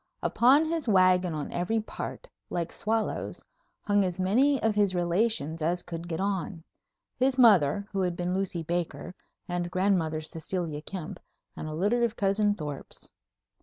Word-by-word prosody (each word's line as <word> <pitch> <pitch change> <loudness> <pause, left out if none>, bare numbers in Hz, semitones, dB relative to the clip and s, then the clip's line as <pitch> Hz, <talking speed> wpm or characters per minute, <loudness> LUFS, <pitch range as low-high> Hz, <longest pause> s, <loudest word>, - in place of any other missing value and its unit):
Upon 270 +6 +4
his 320 -3 -2
wagon 185 -4 +4
on 150 - -4
every 180 +6 0
part, 220 - -6 0.2
like 170 -1 -2
swallows, 220 0 -2 0.4
hung 205 -1 +2
as 180 -1 -2
many 255 +10 +3
of 220 -1 +3
his 205 -3 +2
relations 175 -3 0
as 175 +3 0
could 170 -1 -6
get 165 -2 -3
on. 190 -3 -2 0.5
His 260 +1 +2
mother, 200 - +5
who 195 - -1
had 180 -2 0
been 175 +1 -2
Lucy 185 -3 -2
Baker, 170 -1 -3 0.3
and 175 -1 -2
grandmother 180 -4 +1
Cecilia 160 0 -4
Kempe, 180 +2 -7 0.3
and - - -6
a 155 - -5
litter 205 +8 +1
of 235 -1 +1
cousin 205 +1 +2
Thorpes. 150 -6 -7
185 Hz, 155 wpm, -28 LUFS, 170-210 Hz, 0.5 s, mother